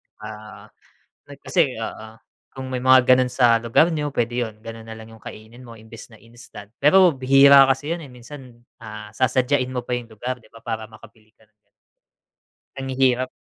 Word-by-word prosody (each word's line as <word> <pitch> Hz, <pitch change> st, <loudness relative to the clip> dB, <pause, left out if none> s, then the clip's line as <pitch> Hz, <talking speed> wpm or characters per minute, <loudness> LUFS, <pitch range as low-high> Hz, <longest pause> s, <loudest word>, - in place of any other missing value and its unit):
'tsaka 105 Hz, -, -15 dB, 1.0 s
nag -, -, -12 dB
kasi -, -, 0 dB
oo, 110 Hz, +1 st, -8 dB, 0.3 s
kung 130 Hz, 0 st, -9 dB
may 125 Hz, -, -3 dB
mga 130 Hz, -1 st, +5 dB
gano'n 130 Hz, 0 st, +3 dB
sa 120 Hz, -3 st, +2 dB
lugar 160 Hz, +8 st, +2 dB
n'yo. 150 Hz, -1 st, -3 dB
Pwede 120 Hz, -2 st, -2 dB
'yun, 110 Hz, -2 st, -7 dB
gano'n 115 Hz, 0 st, -9 dB
nalang 110 Hz, 0 st, -11 dB
'yung 110 Hz, -, -19 dB
kainin 110 Hz, +4 st, -12 dB
mo 115 Hz, -2 st, -13 dB
imbes 110 Hz, +1 st, -14 dB
na 110 Hz, -, -17 dB
instant, 115 Hz, -2 st, -15 dB
pero 180 Hz, +2 st, +5 dB
bihira 135 Hz, +1 st, +6 dB
kasi 135 Hz, +2 st, -1 dB
'yun, 175 Hz, -, -8 dB
eh, 140 Hz, -, -12 dB
minsan, 125 Hz, -1 st, -14 dB, 0.2 s
ah, 105 Hz, -1 st, -10 dB
sasadyain 130 Hz, +1 st, 0 dB
mo 125 Hz, -1 st, -5 dB
pa 125 Hz, -, -2 dB
yung 120 Hz, -2 st, -6 dB
lugar, 125 Hz, +4 st, -6 dB
'di -, -, -23 dB
ba? 115 Hz, -, -15 dB
Para 110 Hz, -1 st, -6 dB
makabili 110 Hz, 0 st, -18 dB
ka 110 Hz, -, -26 dB
ng 105 Hz, -, -45 dB
ganyan. -, -, -48 dB, 1.1 s
Ang 135 Hz, 0 st, -6 dB
hirap. 130 Hz, -1 st, +1 dB
120 Hz, 185 wpm, -21 LUFS, 110-130 Hz, 1.1 s, bihira